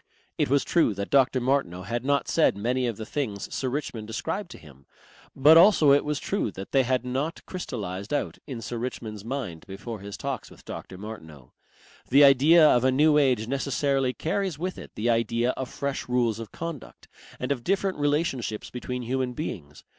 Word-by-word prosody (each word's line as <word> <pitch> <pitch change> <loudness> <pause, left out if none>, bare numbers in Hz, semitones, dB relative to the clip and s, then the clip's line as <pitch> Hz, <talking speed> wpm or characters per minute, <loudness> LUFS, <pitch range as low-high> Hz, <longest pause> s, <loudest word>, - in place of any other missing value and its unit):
It - - +2
was 140 +1 +3
true 160 - +2
that 100 +1 -5
Dr. 135 -1 +4
Martineau 120 -9 0
had 115 +5 -3
not 140 +1 +1
said 155 -11 +3
many 125 +4 0
of 115 -4 -3
the 110 - -6
things 110 -7 -4
Sir 130 - -1
Richmond 125 -5 -4
ascribed 165 - -3
to - - -10
him, 70 -3 -17 0.5
but 150 +4 +7
also 170 -5 +7
it 140 - +5
was 150 -2 -2
true 200 - -1
that 95 - -8
they 135 - +4
had 130 0 0
not 135 +6 -3
crystallized 105 - -5
out 145 - -2
in 120 -5 -6
Sir 120 - -4
Richmond's 110 -4 -5
mind 115 -10 -5
before 100 +3 -7
his 100 +1 -8
talks 140 -2 -4
with - - -17
Dr. 95 - -8
Martineau. 80 - -10 0.6
The 140 +3 +7
idea 150 +4 +7
of 125 -4 +4
a 130 - +4
New 150 +3 +4
Age 130 -6 +2
necessarily 135 0 0
carries 180 +4 -2
with 180 +4 -4
it - - -10
the 110 - -2
idea 115 +2 +1
of 130 -1 -5
fresh 140 -2 -4
rules 120 -3 +1
of 115 -2 -8
conduct 165 -4 -8 0.3
and 125 +2 -3
of 125 -4 -2
different 195 -2 0
relationships 145 -7 -1
between 125 0 -5
human 125 +1 -1
beings. 80 - -6
130 Hz, 190 wpm, -26 LUFS, 110-145 Hz, 0.6 s, but